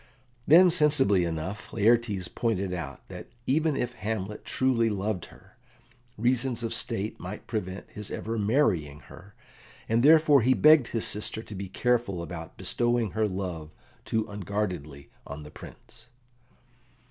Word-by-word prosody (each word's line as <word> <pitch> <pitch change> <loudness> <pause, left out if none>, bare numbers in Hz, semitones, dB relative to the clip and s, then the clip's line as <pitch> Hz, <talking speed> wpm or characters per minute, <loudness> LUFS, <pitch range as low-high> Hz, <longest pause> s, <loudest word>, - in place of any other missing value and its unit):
Then, 175 +4 +7
sensibly 145 - +3
enough, 85 +5 -5
Laertes 110 -4 +2
pointed 100 -5 -2
out 80 -6 -7
that - - -9 0.2
even 155 +2 +1
if 125 0 -2
Hamlet 105 -1 -4
truly 125 -3 +1
loved 100 -2 -2
her, - - -19 0.6
reasons 120 +1 0
of 115 - -2
state 110 -2 -2
might 95 +4 -7
prevent 100 -4 -5
his 105 -1 -6
ever 115 0 -4
marrying 95 - +1
her, 100 +2 -15 0.5
and 115 +1 +2
therefore 150 -1 +6
he 130 +3 +3
begged 155 -5 +6
his 115 - -1
sister 105 +1 -3
to 105 - -10
be 95 -1 -6
careful 115 -5 0
about 80 -1 -8
bestowing 120 -2 0
her 110 -1 0
love 90 -5 -5 0.3
too 110 -1 -1
unguardedly 95 -8 -4 0.2
on 70 +1 -7
the 75 - -11
Prince. - - -14
105 Hz, 140 wpm, -27 LUFS, 95-120 Hz, 0.6 s, Then